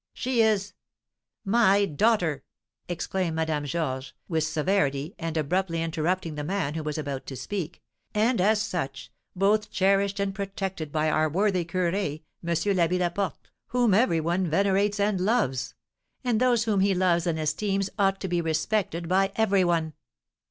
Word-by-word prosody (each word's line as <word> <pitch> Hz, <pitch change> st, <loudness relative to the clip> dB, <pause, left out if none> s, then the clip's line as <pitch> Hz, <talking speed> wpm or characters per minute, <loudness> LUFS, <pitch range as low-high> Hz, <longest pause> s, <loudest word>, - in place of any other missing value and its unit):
"She 250 Hz, -2 st, +1 dB
is 210 Hz, -3 st, +1 dB, 0.4 s
" -, -, -62 dB, 0.2 s
"My 200 Hz, -1 st, +4 dB
daughter!" 175 Hz, -, +1 dB, 0.5 s
exclaimed 175 Hz, 0 st, -2 dB
Madame 160 Hz, -2 st, -1 dB
Georges, 135 Hz, -3 st, -3 dB
with 160 Hz, -3 st, 0 dB
severity, 155 Hz, -1 st, 0 dB
and 165 Hz, -1 st, -3 dB
abruptly 165 Hz, +2 st, 0 dB
interrupting 165 Hz, +1 st, -1 dB
the 150 Hz, 0 st, -4 dB
man 165 Hz, -3 st, -1 dB
who 160 Hz, -, -3 dB
was 150 Hz, 0 st, -3 dB
about 140 Hz, -3 st, -4 dB
to 135 Hz, -, -6 dB
speak, 175 Hz, +5 st, -5 dB, 0.3 s
"and, 220 Hz, 0 st, +2 dB
as 210 Hz, +3 st, +3 dB
such, 165 Hz, -11 st, -4 dB, 0.2 s
both 205 Hz, +3 st, +2 dB
cherished 195 Hz, +1 st, +2 dB
and 200 Hz, -1 st, -1 dB
protected 195 Hz, -5 st, -4 dB
by 155 Hz, 0 st, +1 dB
our 155 Hz, 0 st, +2 dB
worthy 185 Hz, +1 st, +1 dB
curé, 170 Hz, -2 st, -1 dB, 0.2 s
M. 170 Hz, -, -5 dB
l'Abbé 175 Hz, 0 st, +2 dB
Laporte, 180 Hz, -1 st, -2 dB, 0.2 s
whom 245 Hz, -4 st, +2 dB
every 195 Hz, -6 st, +3 dB
one 175 Hz, +3 st, 0 dB
venerates 200 Hz, +4 st, +2 dB
and 200 Hz, -2 st, +1 dB
loves; 185 Hz, -, 0 dB, 0.5 s
and 240 Hz, -4 st, +1 dB
those 245 Hz, -3 st, +3 dB
whom 215 Hz, -4 st, +1 dB
he 195 Hz, 0 st, +3 dB
loves 180 Hz, -1 st, +2 dB
and 165 Hz, -2 st, 0 dB
esteems 195 Hz, +6 st, -1 dB
ought 195 Hz, -1 st, +2 dB
to 190 Hz, -, -2 dB
be 175 Hz, -1 st, 0 dB
respected 170 Hz, +2 st, -1 dB
by 190 Hz, +2 st, +2 dB
every 200 Hz, -4 st, +3 dB
one!" 165 Hz, -3 st, 0 dB
185 Hz, 160 wpm, -26 LUFS, 160-200 Hz, 0.5 s, My